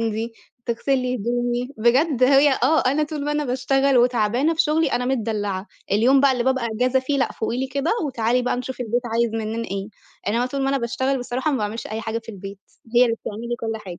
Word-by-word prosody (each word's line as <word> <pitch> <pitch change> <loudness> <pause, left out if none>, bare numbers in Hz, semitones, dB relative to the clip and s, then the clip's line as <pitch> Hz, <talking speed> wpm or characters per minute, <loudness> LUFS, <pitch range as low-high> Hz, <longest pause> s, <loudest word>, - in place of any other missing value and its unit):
عندي، 225 +1 -2 0.3
تغسل 250 +3 0
لي 250 0 -1
هدومي، 245 +2 -1
بجد 255 +4 +2
هي 275 +2 +6
آه، 315 +5 +4
أنا 285 +4 +2
طول 300 -1 -3
ما 295 - -1
أنا 300 0 0
باشتغل 270 +1 +1
وتعبانة 245 +5 +2
في 325 - +3
شُغلي 305 -1 +1
أنا 245 +1 0
متدلّعة، 210 -6 -2 0.3
اليوم 250 +6 +4
بقى 275 -1 +5
اللي 245 -2 -1
بابقى 260 -2 +1
إجازة 255 +3 +2
فيه 275 +2 -1
لأ، 265 - 0
فُوقي 230 +2 -3
لي 265 - -1
كده 280 +4 -1 0.2
وتعالي 245 -1 0
بقى 245 - 0
نشوف 250 0 -5
البيت 240 +1 -1
عايز 230 0 +1
منّنا 225 +1 -3
إيه، 195 +1 -4 0.4
يعني 210 +3 +1
أنا 245 - +1
طول 275 +1 -3
ما 270 - +1
أنا 275 0 +1
باشتغل 260 +3 -1
بصراحة 250 +4 -2
ما 265 - 0
باعملش 215 +2 -3
أي 220 +1 -4
حاجة 225 +1 -3
في 230 - -17
البيت 195 -2 -8 0.4
هي 250 - +8
اللي 230 -2 0
بتعمل 210 +1 -6
لي 240 - -1
كل 225 -1 -2
حاجة. 175 -2 -8
245 Hz, 225 wpm, -22 LUFS, 225-270 Hz, 0.4 s, هي